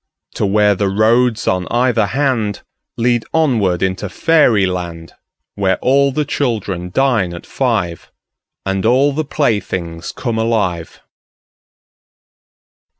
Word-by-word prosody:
To - - -1
where 105 +1 +3
the 100 +1 -1
roads 110 +3 +2
on 90 -1 0
either 120 -3 +2
handLead 120 -1 -2
onward 110 - +1
into 95 +1 -2
fairy 125 - +3
land, 85 -3 -5 0.4
Where 95 -2 0
all 140 +2 +2
the 150 +3 -1
children 105 -11 -2
dine 110 -6 +1
at 85 - -10
five, 110 -10 -2 0.5
And 95 0 -1
all 130 +5 +3
the 155 +3 -1
playthings 95 - -2
come 115 -3 -3
alive. 100 -8 -1
110 Hz, 110 wpm, -17 LUFS, 95-125 Hz, 0.5 s, where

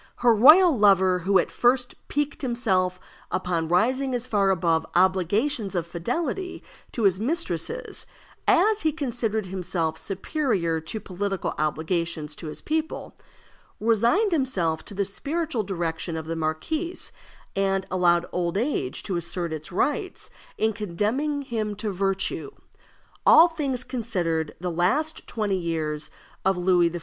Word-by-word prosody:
Her 235 - +7
royal 305 - +7
lover, 190 -4 +4
who 190 +3 +3
at - - +1
first 245 0 +2
piqued 290 0 -2
himself 190 -8 0 0.3
upon 175 -3 -1
rising 255 +9 +2
as 245 0 -2
far 205 -5 +2
above 165 -3 +2
obligations 195 - +2
of 170 -2 0
fidelity 295 - -3 0.3
to 230 - -2
his 190 -2 +3
mistresses 265 - -1 0.4
as 435 0 +4
he 315 - +2
considered 240 -8 -2
himself 180 -3 -2
superior 195 - -1
to 190 +7 -4
political 195 0 -3
obligations 160 0 -2
to 165 - -7
his 155 - -7
people, 315 0 -3 0.6
resigned 235 - +3
himself 195 - 0
to 200 - -7
the 200 0 0
spiritual 290 - -2
direction 170 -3 -3
of 160 - -5
the 165 +1 -3
marquise, 300 - -3 0.4
and 195 -1 +1
allowed 175 -2 +3
old 175 0 -1
age 225 - -1
to 190 -4 -2
assert 170 0 -3
its 155 0 -7
rights 295 - -2 0.3
in 220 0 +1
condemning 225 - -1
him 220 -5 -3
to 210 0 -2
virtue. 195 0 -1 0.7
All 330 - +8
things 280 -7 -2
considered, 175 - -2
the 180 0 -3
last 270 - 0
twenty 210 -4 -1
years 155 -3 -2 0.3
of 190 -1 +2
Louis 175 -1 +3
XIV.' 175 +1 -5
195 Hz, 140 wpm, -25 LUFS, 175-255 Hz, 0.7 s, All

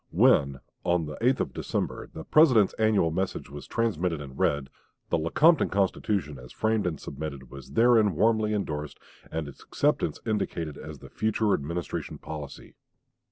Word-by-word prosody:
When, 70 -1 +3 0.2
on 85 -2 +1
the 75 0 -6
8th 130 +3 +2
of 65 - -3
December, - - -3
the 80 - -8
President's 125 - +5
annual 105 -7 +3
message 95 -3 -3
was 75 0 -9
transmitted 90 -8 -1
and 70 -2 -9
read, 70 -1 0 0.4
the - - +2
Lecompton 155 - +4
Constitution, 95 -6 -1
as 60 0 -12
framed 110 -3 0
and 80 - -3
submitted, 70 -3 -7
was 70 -2 -11
therein 115 -5 +4
warmly 110 +3 +2
indorsed 75 -8 -3 0.3
and 80 -2 -3
its 70 - -12
acceptance - - 0
indicated 85 -8 -2
as - - -9
the - - -13
future 110 -1 +1
Administration 85 +4 -3
policy. 75 -3 -8
85 Hz, 155 wpm, -27 LUFS, 75-110 Hz, 0.4 s, President's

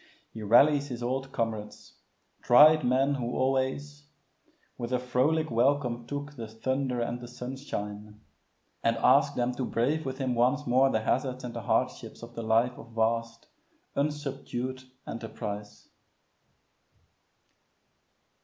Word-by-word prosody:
He 110 - -7
rallies 140 +7 +5
his 120 -3 -6
old 135 +2 -2
comrades 110 -4 -4 0.5
tried 150 +5 +7
men 135 +3 +2
who 125 -3 -3
always 135 +2 -1 0.7
"With 120 +1 -5
a 125 - +2
frolic 130 +5 +1
welcome 120 -1 +1
took 145 +2 -5
The 115 -4 -6
thunder 130 +3 -2
and 120 +1 -2
the 120 - -8
sunshine" 105 -5 -6 0.6
and - - +2
asks - - +4
them 120 0 0
to 130 - -3
brave 140 +7 0
with 130 -1 -4
him 130 -3 -1
once 130 +5 +2
more 130 +2 +4
the 110 - 0
hazards 130 +3 -1
and 120 -1 -5
the - - -5
hardships - - -1
of 120 0 -10
the 115 - -5
life 115 +3 +1
of 115 - -13
vast; 115 +1 -1 0.5
unsubdued 135 -3 -3 0.2
enterprise. 105 -2 -7
125 Hz, 130 wpm, -28 LUFS, 115-135 Hz, 0.7 s, tried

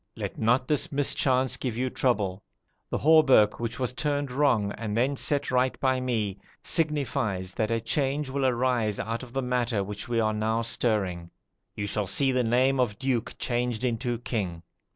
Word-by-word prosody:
Let - - -5
not 125 +3 +1
this 155 +3 +1
mischance 130 -2 +2
give 120 -4 -3
you 130 +1 -1
trouble. 105 -7 0 0.5
The - - -1
hauberk 145 -9 +5
which 115 0 -3
was 125 -1 -1
turned 145 -1 -2
wrong, 125 -7 +2
and 110 0 -4
then 130 +4 +1
set 140 0 0
right 130 0 +1
by 130 -2 +1
me, 110 -6 -2 0.2
signifies 135 - 0
that 110 -1 -1
a 115 0 +1
change 140 +5 -1
will 135 0 0
arise 120 -4 0
out 115 +2 -3
of 130 -2 -10
the 135 +1 -2
matter 120 -4 0
which 105 +3 -6
we 120 -1 +1
are 110 -1 +1
now 110 +2 0
stirring. 95 -7 -1 0.5
You 100 - -3
shall 100 0 -2
see 135 +8 +2
the 130 -1 +1
name 130 +3 +2
of 110 -5 0
duke 130 -4 -2
changed 120 -1 -1
into 120 0 -1
king. 95 -8 -4
120 Hz, 175 wpm, -27 LUFS, 110-130 Hz, 0.5 s, hauberk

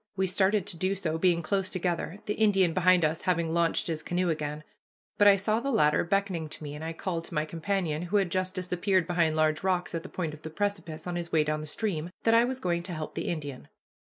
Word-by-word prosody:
We 190 -1 +1
started 190 +1 +2
to 170 - -3
do 185 +3 0
so, 165 -4 -2
being 170 -1 +3
close 195 +2 0
together, 175 0 -2
the 210 - -1
Indian 195 -6 +3
behind 185 -1 +4
us 155 +1 -1
having 170 -3 0
launched 170 -1 +2
his 160 -2 -2
canoe 175 +2 -1
again, 150 -1 -4 0.6
but 205 - +7
I 200 - +8
saw 215 +3 0
the 275 - -2
latter 150 - +3
beckoning 180 -3 -1
to 155 - -7
me, 145 -1 -6
and 150 +1 -7
I 165 - -3
called 165 0 -4
to 170 - -9
my 150 0 +1
companion, 165 -1 -2
who 180 +4 0
had 190 -4 +1
just 185 +1 -1
disappeared 185 0 +1
behind 170 -2 +1
large 155 0 +2
rocks 185 -2 0
at 165 - -2
the 185 - -10
point 165 -4 -3
of 155 - -11
the 160 - -6
precipice 170 -3 -3
on 175 -1 -3
his 170 -1 -5
way 155 -2 +4
down 155 0 -1
the 155 - -7
stream, 170 -2 -2
that 225 - +4
I 230 +1 +6
was 260 +1 -3
going 175 -6 0
to 175 +1 -6
help 155 -1 -5
the - - -4
Indian. 145 -6 -5
175 Hz, 245 wpm, -28 LUFS, 160-190 Hz, 0.6 s, I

